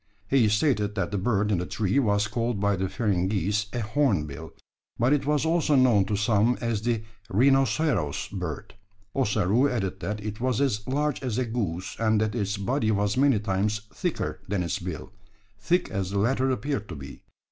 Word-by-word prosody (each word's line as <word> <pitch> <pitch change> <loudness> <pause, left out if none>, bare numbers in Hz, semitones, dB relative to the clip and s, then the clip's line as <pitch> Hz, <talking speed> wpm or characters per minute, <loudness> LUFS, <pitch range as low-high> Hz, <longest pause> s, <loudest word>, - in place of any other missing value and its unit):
He 125 -4 +4
stated 105 -3 +1
that 100 - -1
the 100 - -1
bird 105 0 +1
in 95 - +2
the 90 - -3
tree 110 +5 0
was 105 -4 +2
called 115 -1 -2
by 100 0 +2
the 95 0 -2
Feringhees 100 -1 0
a 120 - -2
"hornbill," 105 - -1 0.5
but 120 +5 +3
it 145 -1 0
was 150 0 +2
also 160 -2 +2
known 120 -7 +4
to 105 - -1
some 110 +3 +2
as 115 -3 -1
the 115 -1 -1 0.3
"rhinoceros 130 - +2
bird." 90 -6 -5 0.4
Ossaroo 110 +1 +2
added 95 -6 -2
that 105 +4 -3
it 105 +1 -5
was 125 -2 +1
as 105 -7 0
large 145 +2 0
as 125 -4 -2
a 130 - +1
goose; 100 -7 -3
and 110 -1 +2
that 110 0 0
its 105 -3 -1
body 110 +4 0
was 105 -1 +1
many 135 -2 +4
times 105 +1 -1
thicker - - -3
than 95 -2 -1
its 85 - -2
bill, 90 0 -6 0.5
thick 175 - +1
as 95 -3 -2
the 100 - -2
latter 130 +5 +2
appeared 130 -3 -2
to 85 - -6
be. 70 -1 -10
105 Hz, 185 wpm, -26 LUFS, 100-130 Hz, 0.5 s, He